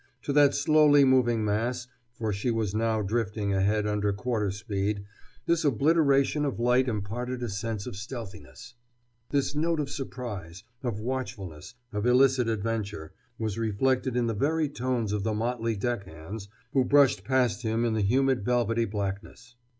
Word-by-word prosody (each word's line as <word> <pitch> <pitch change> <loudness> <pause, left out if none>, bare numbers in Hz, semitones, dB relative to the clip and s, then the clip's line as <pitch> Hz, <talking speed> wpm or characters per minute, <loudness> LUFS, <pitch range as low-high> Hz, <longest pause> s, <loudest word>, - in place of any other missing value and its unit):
To 140 - -2
that 145 -1 +5
slowly 145 -1 +5
moving 120 -4 +3
mass, 120 +4 -1 0.3
for 110 -3 -3
she 100 +6 -2
was 110 -4 -1
now 110 0 +1
drifting 105 -1 -1
ahead 105 +2 +1
under 105 -1 0
quarter 105 0 -1
speed, 100 0 -2 0.4
this 170 -1 +2
obliteration 145 +1 +3
of 140 -5 -2
light 125 +2 +3
imparted 120 +3 -3
a 120 - -2
sense 105 +1 -3
of - - -6
stealthiness. 100 - -9 0.6
This 140 -1 0
note 160 +2 0
of 145 -2 -2
suspense, 105 - -6 0.2
of 120 -6 -3
watchfulness, 110 - -5 0.2
of 105 +3 -1
illicit 125 -1 +4
adventure, 105 -6 -3 0.2
was 110 -1 -3
reflected 125 +4 0
in 120 - +2
the 115 - 0
very 150 +7 +1
tones 125 -6 -2
of 105 - -1
the 110 +1 -1
motley 115 0 -1
deckhands 100 -2 -5 0.2
who 135 - +4
brushed 140 0 +4
past 125 -6 +1
him 115 0 0
in 115 - +1
the 110 - 0
humid 130 +4 +2
velvety 115 -1 +1
blackness. 105 +4 -5
115 Hz, 155 wpm, -28 LUFS, 105-130 Hz, 0.6 s, that